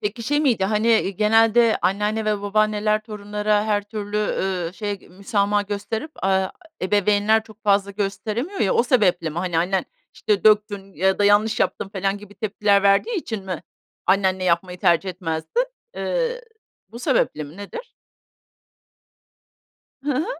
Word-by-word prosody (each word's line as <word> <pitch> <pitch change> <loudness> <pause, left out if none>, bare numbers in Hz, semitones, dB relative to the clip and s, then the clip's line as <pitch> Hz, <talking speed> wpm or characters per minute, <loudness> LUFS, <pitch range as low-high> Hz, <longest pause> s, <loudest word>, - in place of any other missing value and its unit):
Peki, 210 +3 -3
şey 290 +6 +1
miydi? 245 -10 +2
Hani, 215 +3 +1 0.2
ııı, - - -1
genelde 225 +3 +3
anneanne 210 +3 0
ve 210 -1 0
babaanneler 215 +1 +1
torunlara 210 -1 -1
her 210 -1 +1
türlü, 205 0 -5
eee, 190 -4 -1
şey 205 -1 -5
müsamaha 200 +2 0
gösterip, 205 +7 -4
aaa, 190 0 +2 0.3
ebeveynler 205 +3 +3
çok 220 0 -17
fazla 200 -1 +2
gösteremiyor 210 - -3
ya, 195 - +2
o - - +4
sebeple 195 -10 +2
mi? 160 - -5
Hani, 175 -2 -1
annen, 180 +2 0 0.3
işte, 205 -2 -1
döktün 205 -2 +2
ya 190 +4 +1
da 205 - +2
yanlış 210 +2 +3
yaptın - - 0
felan 195 0 -2
gibi 205 0 -14
tepkiler 205 -2 +1
verdiği 200 - +3
için 220 - -4
mi 185 -3 -5 0.4
annenle 190 -1 +2
yapmayı 180 +1 0
tercih 180 0 +2
etmezdin? 175 - -2 0.3
Eee, - - -1 0.5
bu 235 - -10
sebeple 155 -9 0
mi? 145 +5 -12
Nedir? 465 - -8 2.1
Hı 290 - 0
hı. 305 - 0
205 Hz, 145 wpm, -22 LUFS, 195-215 Hz, 2.1 s, o